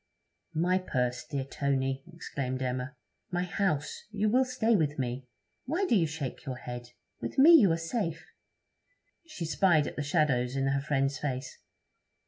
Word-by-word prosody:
'My 180 Hz, +4 st, +2 dB
purse, 125 Hz, -8 st, -1 dB
dear 140 Hz, -2 st, -2 dB
Tony!' 135 Hz, -1 st, -1 dB
exclaimed 130 Hz, -6 st, -4 dB
Emma. 130 Hz, +2 st, -3 dB, 0.3 s
'My 180 Hz, 0 st, -1 dB
house! 180 Hz, -5 st, -1 dB
You 215 Hz, 0 st, 0 dB
will 255 Hz, +4 st, +4 dB
stay 235 Hz, -3 st, +2 dB
with 150 Hz, -5 st, +1 dB
me? 125 Hz, 0 st, -3 dB, 0.4 s
Why 335 Hz, +10 st, 0 dB
do 240 Hz, -, +3 dB
you 170 Hz, -5 st, +3 dB
shake 145 Hz, -3 st, -5 dB
your 130 Hz, -3 st, -4 dB
head? 120 Hz, -1 st, -7 dB, 0.3 s
With 115 Hz, -, -5 dB
me 290 Hz, +5 st, +8 dB
you 240 Hz, -, +8 dB
are 165 Hz, -, +2 dB
safe.' 165 Hz, +1 st, -3 dB, 1.0 s
She 180 Hz, -, -5 dB
spied 160 Hz, -2 st, +3 dB
at -, -, -6 dB
the -, -, -1 dB
shadows 140 Hz, -5 st, +1 dB
in 135 Hz, 0 st, 0 dB
her 140 Hz, 0 st, +1 dB
friend's 135 Hz, -1 st, 0 dB
face. 130 Hz, -3 st, -4 dB
150 Hz, 160 wpm, -30 LUFS, 130-185 Hz, 1.0 s, me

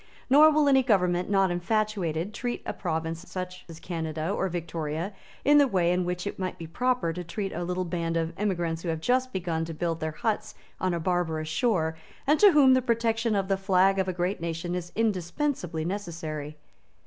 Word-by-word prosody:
Nor 300 Hz, +3 st, +8 dB
will 305 Hz, -1 st, +3 dB
any 270 Hz, -1 st, +6 dB
government 180 Hz, -7 st, +2 dB
not 195 Hz, -2 st, +3 dB
infatuated 190 Hz, -1 st, -1 dB
treat 240 Hz, +2 st, -3 dB
such -, -, -4 dB
a -, -, -20 dB
province 165 Hz, +1 st, -4 dB, 0.3 s
as 165 Hz, -1 st, -9 dB
Canada 160 Hz, -1 st, -3 dB
or 190 Hz, -2 st, 0 dB
Victoria 165 Hz, +1 st, -3 dB, 0.3 s
in 290 Hz, +1 st, +7 dB
the 285 Hz, -, +5 dB
way 180 Hz, -7 st, +2 dB
in 180 Hz, 0 st, +1 dB
which 180 Hz, +1 st, -3 dB
it 200 Hz, -, -5 dB
might 185 Hz, -1 st, -3 dB
be 165 Hz, -, -7 dB
proper 245 Hz, 0 st, 0 dB
to 180 Hz, +1 st, -5 dB
treat 195 Hz, +3 st, -4 dB
a 175 Hz, -, -3 dB
little 180 Hz, +1 st, -2 dB
band 170 Hz, -1 st, -2 dB
of 165 Hz, 0 st, -1 dB
emigrants 170 Hz, -5 st, -1 dB
who 170 Hz, -, -4 dB
have 160 Hz, -1 st, -1 dB
just 255 Hz, +7 st, +1 dB
begun 170 Hz, -5 st, -2 dB
to 165 Hz, -1 st, -6 dB
build 165 Hz, 0 st, -2 dB
their 155 Hz, -1 st, -3 dB
huts 220 Hz, +5 st, -2 dB, 0.2 s
on 185 Hz, -2 st, 0 dB
a -, -, -2 dB
barbarous 160 Hz, -2 st, -1 dB
shore, 160 Hz, -3 st, +1 dB, 0.3 s
and 300 Hz, +2 st, +3 dB
to 410 Hz, -1 st, +8 dB
whom 280 Hz, -5 st, +6 dB
the 260 Hz, -, +4 dB
protection 230 Hz, -2 st, +1 dB
of 195 Hz, -1 st, 0 dB
the 195 Hz, -1 st, +1 dB
flag 195 Hz, 0 st, +3 dB
of 190 Hz, -, +1 dB
a -, -, +1 dB
great 180 Hz, +1 st, -2 dB
nation 170 Hz, +1 st, -3 dB
is 175 Hz, -1 st, -4 dB
indispensably 185 Hz, -, -1 dB
necessary. 160 Hz, -6 st, -5 dB
180 Hz, 200 wpm, -27 LUFS, 165-215 Hz, 0.3 s, Nor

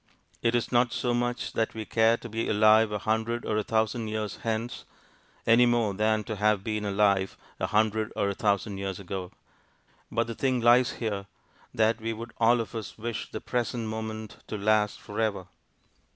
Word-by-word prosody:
It 115 Hz, 0 st, +2 dB
is 120 Hz, -, 0 dB
not 120 Hz, 0 st, +3 dB
so 120 Hz, +2 st, 0 dB
much 120 Hz, 0 st, -1 dB
that 115 Hz, -1 st, -1 dB
we 110 Hz, -1 st, -4 dB
care 115 Hz, +1 st, +3 dB
to 120 Hz, -, -9 dB
be 115 Hz, 0 st, -2 dB
alive 110 Hz, +1 st, +5 dB
a 105 Hz, -, -1 dB
hundred 110 Hz, +3 st, -1 dB
or 110 Hz, -, -1 dB
a 110 Hz, -, +1 dB
thousand 110 Hz, +1 st, 0 dB
years 110 Hz, -1 st, -3 dB
hence, 115 Hz, +2 st, -3 dB, 0.6 s
any 120 Hz, +2 st, +6 dB
more 120 Hz, -4 st, +2 dB
than 110 Hz, +2 st, +1 dB
to 110 Hz, -1 st, -5 dB
have 105 Hz, -1 st, +2 dB
been 110 Hz, -1 st, -2 dB
alive 100 Hz, -1 st, +2 dB, 0.2 s
a -, -, 0 dB
hundred 110 Hz, 0 st, +1 dB
or 100 Hz, -, +1 dB
a 100 Hz, -, 0 dB
thousand 100 Hz, 0 st, 0 dB
years 95 Hz, -1 st, -4 dB
ago: 95 Hz, -1 st, -5 dB, 0.8 s
but 115 Hz, +1 st, +1 dB
the 115 Hz, -, -5 dB
thing 130 Hz, +1 st, 0 dB
lies 120 Hz, +1 st, +5 dB
here, 100 Hz, -4 st, -3 dB, 0.4 s
that 110 Hz, +1 st, +2 dB
we 115 Hz, +1 st, -2 dB
would 115 Hz, +1 st, -8 dB
all 120 Hz, +1 st, +5 dB
of 115 Hz, -, -7 dB
us 110 Hz, -2 st, -6 dB
wish 115 Hz, 0 st, -4 dB
the -, -, -6 dB
present 120 Hz, -2 st, -2 dB
moment 110 Hz, -1 st, -5 dB
to 105 Hz, -, -4 dB
last 105 Hz, 0 st, +2 dB
for 105 Hz, -, -7 dB
ever. 105 Hz, -4 st, 0 dB
110 Hz, 190 wpm, -28 LUFS, 105-115 Hz, 0.8 s, any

